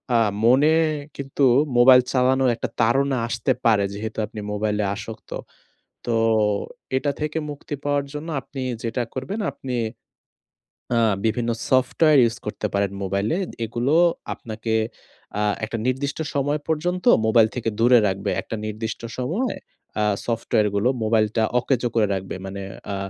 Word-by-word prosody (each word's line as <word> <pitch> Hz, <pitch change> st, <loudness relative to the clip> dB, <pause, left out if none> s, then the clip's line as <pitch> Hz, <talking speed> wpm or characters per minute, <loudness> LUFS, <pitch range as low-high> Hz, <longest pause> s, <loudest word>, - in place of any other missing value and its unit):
আ -, -, +6 dB, 0.3 s
মনে 135 Hz, +6 st, +5 dB, 0.4 s
কিন্তু 140 Hz, 0 st, -2 dB, 0.3 s
মোবাইল 125 Hz, +1 st, +8 dB
চালানোর 130 Hz, 0 st, +3 dB
একটা -, -, -4 dB
তাড়না 135 Hz, +3 st, +2 dB
আসতে 120 Hz, -1 st, -1 dB
পারে 110 Hz, -3 st, +4 dB
যেহেতু 110 Hz, +2 st, -6 dB
আপনি 110 Hz, 0 st, -9 dB
মোবাইলে 105 Hz, 0 st, 0 dB
আসক্ত। 110 Hz, +2 st, -9 dB, 0.8 s
তো 120 Hz, -, 0 dB, 0.8 s
এটা 145 Hz, +2 st, 0 dB
থেকে 150 Hz, +1 st, -1 dB
মুক্তি 145 Hz, 0 st, -7 dB
পাওয়ার 145 Hz, -1 st, +1 dB
জন্য 150 Hz, +3 st, -6 dB
আপনি 135 Hz, +1 st, -8 dB, 0.2 s
যেটা 120 Hz, +2 st, -1 dB
করবেন 190 Hz, +12 st, -4 dB
আপনি 130 Hz, -2 st, -6 dB, 1.2 s
আ 115 Hz, -, +3 dB, 0.3 s
বিভিন্ন 115 Hz, +1 st, 0 dB, 0.2 s
সফটওয়্যার 135 Hz, +4 st, +4 dB
ইউজ 115 Hz, 0 st, +1 dB
করতে 105 Hz, 0 st, -3 dB
পারেন 100 Hz, -1 st, +1 dB
মোবাইলে। 100 Hz, -, 0 dB, 0.3 s
এগুলো 120 Hz, +6 st, -1 dB, 0.4 s
আপনাকে 110 Hz, 0 st, -5 dB, 0.7 s
আ -, -, +1 dB, 0.2 s
একটা 115 Hz, +1 st, -4 dB
নির্দিষ্ট 140 Hz, +3 st, -1 dB
সময় 145 Hz, +2 st, 0 dB
পর্যন্ত 175 Hz, +3 st, -1 dB, 0.2 s
মোবাইল 110 Hz, 0 st, +5 dB
থেকে 115 Hz, -2 st, -1 dB
দূরে 120 Hz, +1 st, +6 dB
রাখবে। 95 Hz, 0 st, -2 dB
একটা 115 Hz, -, -6 dB
নির্দিষ্ট 110 Hz, +1 st, -4 dB, 0.2 s
সময় 175 Hz, -, -1 dB, 0.5 s
আ -, -, +2 dB, 0.2 s
সফটওয়্যারগুলো 110 Hz, -1 st, +1 dB
মোবাইলটা 110 Hz, 0 st, +2 dB, 0.2 s
অকেজো 125 Hz, -1 st, 0 dB
করে 110 Hz, -2 st, +3 dB
রাখবে। 95 Hz, -1 st, -4 dB
মানে 100 Hz, +1 st, -6 dB, 0.3 s
আ -, -, -2 dB
120 Hz, 135 wpm, -23 LUFS, 110-135 Hz, 1.2 s, মোবাইল